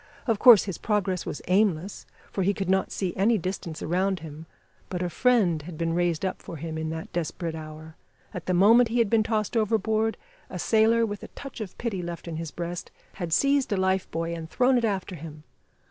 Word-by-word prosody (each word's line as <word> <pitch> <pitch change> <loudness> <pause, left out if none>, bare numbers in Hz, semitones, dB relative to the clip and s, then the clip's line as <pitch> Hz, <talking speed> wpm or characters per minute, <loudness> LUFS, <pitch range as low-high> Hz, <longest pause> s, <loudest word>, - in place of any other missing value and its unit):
Of 225 -4 +1
course 240 -5 +9
his 190 -5 -5
progress 200 -4 -1
was - - -5
aimless, 190 -1 +1 0.2
for 195 - -2
he 195 +2 +2
could 190 -2 -1
not 190 0 +1
see 185 -3 -2
any 220 +4 +3
distance 180 -3 -5
around 185 +1 0
him, 160 0 -9 0.4
but 180 -1 -2
a 175 - -2
friend 200 -7 +3
had 160 +1 -9
been 165 0 -1
raised 175 0 0
up 190 - -3
for - - -8
him 160 +1 -5
in 160 0 -3
that 160 0 -6
desperate 170 0 -3
hour. 155 0 -9 0.4
At 180 - -7
the 185 - +2
moment 225 +6 +6
he 235 - -1
had 230 -4 +2
been 225 -1 +5
tossed 215 0 -1
overboard, 220 0 +1 0.3
a 185 - -6
sailor, 225 +4 +3
with 205 -2 -5
a - - -8
touch 275 -4 -9
of 200 -4 -7
pity 215 -6 -3
left 170 0 -6
in 165 -2 -4
his 165 -1 -4
breast 175 +2 -5 0.3
had 170 -2 -3
seized 275 - +2
a 200 - +1
life 190 0 +1
buoy 165 +1 -3
and 165 -1 -6
thrown 255 +6 +3
it 240 -2 +2
after 195 -2 -2
him. 155 -1 -10
185 Hz, 215 wpm, -26 LUFS, 165-215 Hz, 0.4 s, course